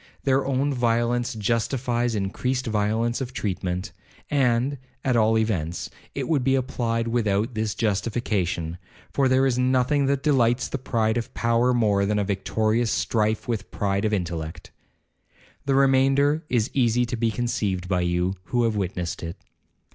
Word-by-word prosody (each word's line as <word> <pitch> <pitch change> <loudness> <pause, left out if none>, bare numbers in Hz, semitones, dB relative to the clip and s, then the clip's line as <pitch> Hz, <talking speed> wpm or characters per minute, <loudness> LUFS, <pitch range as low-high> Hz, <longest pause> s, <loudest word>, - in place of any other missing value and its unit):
Their 135 0 +2
own 140 +1 +1
violence 120 0 +1
justifies 120 +2 0
increased 125 +6 -1
violence 110 +2 0
of 125 -1 -4
treatment; 95 -2 -3 0.4
and, 135 0 +2 0.3
at 130 -2 +2
all 110 -1 +4
events, 90 -7 -1 0.2
it - - -2
would 150 -6 +1
be 135 +1 +3
applied 115 -3 -1
without 115 0 0
this 110 -1 -2
justification, 95 -5 -1 0.3
for 135 -1 +3
there 130 +1 +4
is 125 -2 +1
nothing 130 +2 +2
that 140 0 0
delights 125 -4 +2
the 135 - -4
pride 115 -3 0
of 115 - -3
power, 115 +1 +2
more 105 -5 +2
than 105 +1 +1
a 105 - +1
victorious 110 +4 0
strife 110 0 0
with 115 -3 0
the - - -17
pride 100 -1 0
of 110 - +1
intellect. 85 -5 -4 1.0
The 135 - +3
remainder 135 +3 +3
is 120 -2 +1
easily 125 -2 +2
to 120 +1 -3
be 115 0 +1
conceived 105 -6 -2
by 90 -1 +1
you, 90 +1 0
who 120 -1 0
have 115 -2 +1
witnessed 90 -3 -3
it. 85 +1 -6
115 Hz, 155 wpm, -24 LUFS, 105-125 Hz, 1.0 s, all